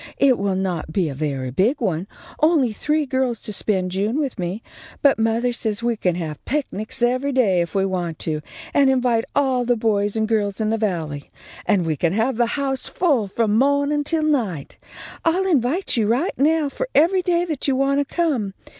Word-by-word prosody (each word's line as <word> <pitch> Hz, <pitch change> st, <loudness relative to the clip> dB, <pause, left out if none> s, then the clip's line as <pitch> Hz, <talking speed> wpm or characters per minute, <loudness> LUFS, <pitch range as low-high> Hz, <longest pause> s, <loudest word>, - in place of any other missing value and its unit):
It 265 Hz, -3 st, +4 dB
will 195 Hz, -1 st, 0 dB
not 180 Hz, -4 st, -2 dB
be 170 Hz, -1 st, 0 dB
a -, -, -5 dB
very 135 Hz, -3 st, -3 dB
big 210 Hz, -, +1 dB
one, 185 Hz, -5 st, -1 dB, 0.3 s
only 300 Hz, -7 st, +3 dB
three 300 Hz, +6 st, 0 dB
girls 260 Hz, -3 st, -1 dB
to 210 Hz, -, -5 dB
spend 190 Hz, -3 st, 0 dB
June 205 Hz, +7 st, -1 dB
with 275 Hz, -8 st, -2 dB
me, 180 Hz, +5 st, -3 dB, 0.4 s
but 280 Hz, -5 st, +4 dB
mothah 230 Hz, +2 st, +1 dB
says 220 Hz, -1 st, -2 dB
we 235 Hz, -1 st, +1 dB
can 180 Hz, -5 st, 0 dB
have 155 Hz, -4 st, -5 dB
picnics 245 Hz, -6 st, -2 dB
every 255 Hz, +3 st, +1 dB
day 210 Hz, -9 st, +3 dB
if 170 Hz, +3 st, -4 dB
we 195 Hz, 0 st, +2 dB
want 175 Hz, -4 st, -3 dB
to, 155 Hz, -2 st, -2 dB, 0.3 s
and 280 Hz, -1 st, +4 dB
invite 245 Hz, -3 st, +2 dB
all 265 Hz, -3 st, +2 dB
the 245 Hz, 0 st, +2 dB
boys 205 Hz, -2 st, 0 dB
and 220 Hz, 0 st, 0 dB
girls 210 Hz, -3 st, 0 dB
in 215 Hz, 0 st, 0 dB
the 225 Hz, -, +1 dB
Valley, 160 Hz, -9 st, -3 dB, 0.4 s
and 195 Hz, -5 st, +2 dB
we 160 Hz, -1 st, 0 dB
can 170 Hz, +3 st, 0 dB
have 225 Hz, +4 st, 0 dB
the 240 Hz, -1 st, +2 dB
house 270 Hz, -2 st, 0 dB
full 280 Hz, -, +1 dB
from 215 Hz, +1 st, 0 dB
mawnin' 285 Hz, +3 st, +2 dB
till 315 Hz, +1 st, 0 dB
night. 225 Hz, -, -1 dB, 0.4 s
I'll 355 Hz, +4 st, +2 dB
invite 320 Hz, +1 st, +1 dB
you 220 Hz, -3 st, +1 dB
right 255 Hz, -, +1 dB
now 310 Hz, +2 st, +2 dB
for -, -, -4 dB
every 345 Hz, +6 st, +4 dB
day 350 Hz, -1 st, +1 dB
that 310 Hz, -6 st, -3 dB
you 270 Hz, -, +2 dB
want 275 Hz, +1 st, +2 dB
to 285 Hz, -, -3 dB
come. 260 Hz, -, 0 dB
230 Hz, 200 wpm, -21 LUFS, 195-280 Hz, 0.4 s, It